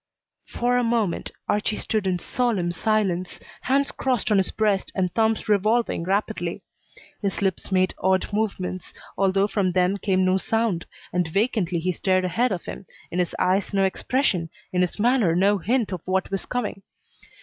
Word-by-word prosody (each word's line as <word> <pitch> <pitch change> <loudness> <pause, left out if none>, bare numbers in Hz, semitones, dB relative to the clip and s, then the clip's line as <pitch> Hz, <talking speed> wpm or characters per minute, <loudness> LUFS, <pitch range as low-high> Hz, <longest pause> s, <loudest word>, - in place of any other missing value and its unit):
For 245 +1 0
a 245 - +2
moment 230 -6 0 0.2
Archie 210 +1 0
stood 215 -3 -1
in 185 -1 +1
solemn 200 -3 0
silence, 185 -2 0 0.2
hands 275 +2 +1
crossed 250 -4 -1
on 205 - +5
his 190 - +1
breast 210 -3 0
and 180 -2 0
thumbs 225 -1 +1
revolving 215 -2 +2
rapidly. 190 -2 -1 0.6
His 200 -1 -2
lips 190 0 -1
made 185 0 +2
odd 190 +2 +1
movements, 195 -4 -2 0.2
although 195 0 +2
from 200 -3 0
them 185 +2 +2
came 190 -2 +1
no 185 0 +3
sound, 220 -4 0 0.3
and 180 -1 +1
vacantly 195 -1 0
he 180 +2 0
stared 185 0 +1
ahead 230 +8 +1
of 180 -3 -3
him, 190 - -8 0.2
in 175 - -1
his 175 -2 0
eyes 195 +2 +1
no 195 - +3
expression, 190 - 0 0.2
in 180 - +2
his 180 - 0
manner 220 -6 +3
no 200 +3 +3
hint 230 +3 0
of 180 -3 -4
what 190 +1 0
was 195 - -2
coming. 240 -5 -3
195 Hz, 170 wpm, -24 LUFS, 185-220 Hz, 0.6 s, on